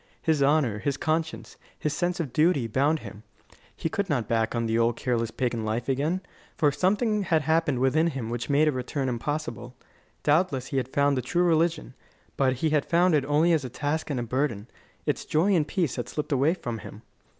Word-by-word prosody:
His 155 -3 +1
honour, 140 -7 +2
his 140 +4 -1
conscience, 160 +1 -2 0.2
his 150 - -2
sense 175 0 -1
of 145 -7 -3
duty, 155 -5 +3
bound 140 +7 +1
him. 105 -1 -10 0.5
He - - -2
could 200 +2 -2
not 135 -6 +1
go - - -22
back 115 -1 +1
to 120 - -2
the 115 0 0
old 115 0 +2
careless 115 -3 -1
pagan 120 -1 -2
life 110 +2 -2
again; 150 +7 0 0.4
for 145 -2 +3
something 210 - +1
had 165 -5 +1
happened 160 -3 +1
within 135 +6 +2
him 130 -8 -4
which 120 +2 -4
made 145 +2 +4
a - - +4
return 130 +1 -3
impossible. 125 -1 -4 0.5
Doubtless 145 -4 +2
he 135 - -2
had 130 - 0
found 140 +1 +2
the - - 0
true 175 +7 0
religion, 165 -4 +1 0.4
but 130 -2 +2
he 150 +5 -1
had 150 -2 +2
found 175 +1 +3
it 145 -3 +2
only 155 +4 +3
as 155 -4 +1
a 130 - -5
task 145 +6 -2
and 140 -4 -1
a - - -2
burden; 120 -3 -2 0.4
its - - -1
joy 175 +6 +2
and 160 -4 +2
peace 175 -10 -1
had 120 - -4
slipped 150 - -4
away 140 +5 +3
from 120 -10 -5
him. 105 +1 -11
145 Hz, 210 wpm, -26 LUFS, 125-160 Hz, 0.5 s, made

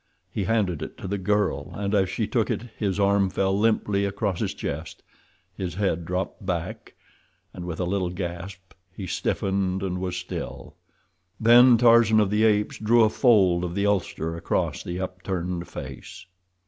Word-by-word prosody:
He 100 0 -2
handed 100 -6 0
it - - -7
to - - -7
the 100 +1 -2
girl, 95 -7 0
and 100 0 -2
as 95 -3 +2
she - - -1
took - - 0
it - - -2
his 100 -2 -2
arm 100 -1 +3
fell 95 +1 0
limply 105 -1 +1
across 100 -1 -1
his - - -2
chest, 75 +2 -6 0.5
his 90 -2 -4
head 95 -4 -1
dropped 90 +4 -3
back, 85 -3 -4 0.6
and 90 -1 -7
with 85 -2 -5
a - - 0
little 95 0 -1
gasp 90 +1 -7 0.2
he 100 - -5
stiffened 95 +1 -1
and 90 -1 -2
was 90 -1 -3
still. 90 - -6 0.7
Then 120 +2 +7
Tarzan 115 -2 +5
of 105 -2 +2
the 105 +1 +3
Apes 105 -1 +1
drew 115 +2 +4
a 110 - +4
fold 95 -10 +4
of 90 0 -3
the 100 0 0
ulster 90 -5 -1
across 85 - -1
the 90 +1 -5
upturned 90 -1 -4
face. - - -9
95 Hz, 170 wpm, -25 LUFS, 90-105 Hz, 0.7 s, Then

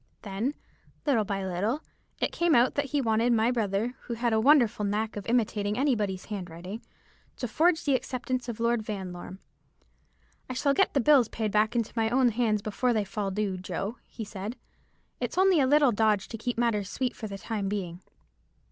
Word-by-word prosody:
Then, 220 +7 -2 0.5
little 245 -8 +2
by 195 -1 -2
little, 200 - -1 0.4
it - - 0
came 340 -3 +2
out 240 +2 +4
that 285 - 0
he 285 +1 0
wanted 230 0 +2
my 225 +1 +3
brother, 220 0 0
who 235 - -3
had 235 0 0
a 220 - +3
wonderful 245 -5 +4
knack 210 +2 -1
of 205 - -6
imitating 210 -3 0
any 275 +1 +3
body's 195 -4 -2
handwriting, 185 +1 -6 0.6
to 250 - -3
forge 320 +8 +2
the 285 - +3
acceptance 255 -1 -2
of 230 -1 -5
Lord 235 0 +2
Vanlorme. 190 -3 -6 1.1
'I - - -2
shall 280 +2 +2
get 390 +1 +2
the 275 - +4
bills 265 -4 +5
back 215 +1 0
into 230 -2 -1
my 225 -1 +1
own 250 +1 +4
hands 215 -3 0
before 240 +4 0
they 215 -2 0
fall 200 0 -3
due, 195 -1 -1
Joe,' 195 +5 -4
he 230 - -7
said; 205 +3 -6 0.6
'it's - - -3
only 375 -3 +5
a 265 - +3
little 290 -1 +5
dodge 210 -2 +2
to - - -6
keep 245 +1 -3
matters 215 -4 +1
sweet 255 -2 -2
for 220 - -6
the 200 -1 -6
time 200 -1 -3
being.' 180 -4 -4
225 Hz, 190 wpm, -28 LUFS, 205-250 Hz, 1.1 s, bills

